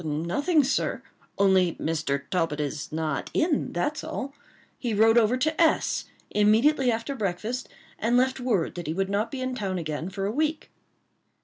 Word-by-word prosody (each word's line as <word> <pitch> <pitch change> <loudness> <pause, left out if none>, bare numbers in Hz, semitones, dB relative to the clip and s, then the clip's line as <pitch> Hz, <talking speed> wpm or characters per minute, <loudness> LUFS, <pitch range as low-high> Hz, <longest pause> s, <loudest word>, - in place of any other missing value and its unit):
"Nothing, 170 - +1
sir; 265 +1 -1 0.3
only 190 -3 +3
Mr. 150 -3 -2
Talbot 165 -4 0
is 145 0 -3
not 155 -2 -2
in, 320 -3 +1
that's 235 - -2
all. 280 -3 -5 0.5
He 235 -4 -1
rode 225 +2 +5
over 235 +1 +4
to 310 +5 0
S——, 325 - +2 0.3
immediately 240 +6 +4
after 230 +4 -2
breakfast, 220 +3 -3 0.3
and 235 +3 +2
left 260 +1 +2
word 225 -10 0
that 175 -3 -6
he 160 - -2
would 195 +1 -1
not 205 +3 0
be 270 -2 -5
in 255 0 -2
town 195 -6 -2
again 155 +1 -3
for 195 0 -4
a 200 - 0
week." 305 +5 -1
215 Hz, 170 wpm, -26 LUFS, 175-260 Hz, 0.5 s, rode